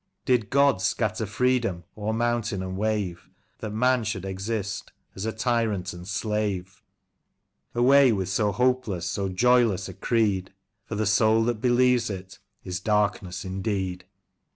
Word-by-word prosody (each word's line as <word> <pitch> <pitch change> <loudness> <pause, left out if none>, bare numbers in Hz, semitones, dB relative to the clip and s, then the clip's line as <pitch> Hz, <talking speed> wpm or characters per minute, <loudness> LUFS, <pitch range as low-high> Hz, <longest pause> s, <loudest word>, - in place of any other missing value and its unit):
Did 120 -6 +2
God 140 -8 +3
scatter 110 +1 0
freedom 115 -4 0
o'er 105 0 -2
mountain 115 -3 -1
and 95 0 -4
wave. 100 -4 -2 0.3
That 110 - -4
man 125 +3 +2
should 100 -3 -3
exist 100 +1 -4 0.2
as 95 +3 -4
a - - 0
tyrant 110 -5 -1
and 90 0 -10
slave? 100 -2 -2 0.9
Away 130 +2 +6
with 95 -4 -1
so 105 +2 +1
hopeless, 125 -5 0
so 100 -1 -2
joyless 120 0 +3
a - - -8
creed, 100 -5 0 0.3
For 110 - -5
the 110 +1 0
soul 110 +2 +4
that 115 -2 -1
believes 125 -1 +3
it 95 -1 -7 0.2
is 90 -1 -4
darkened 100 -3 0
indeed 95 -1 -3
105 Hz, 140 wpm, -26 LUFS, 95-120 Hz, 0.9 s, Away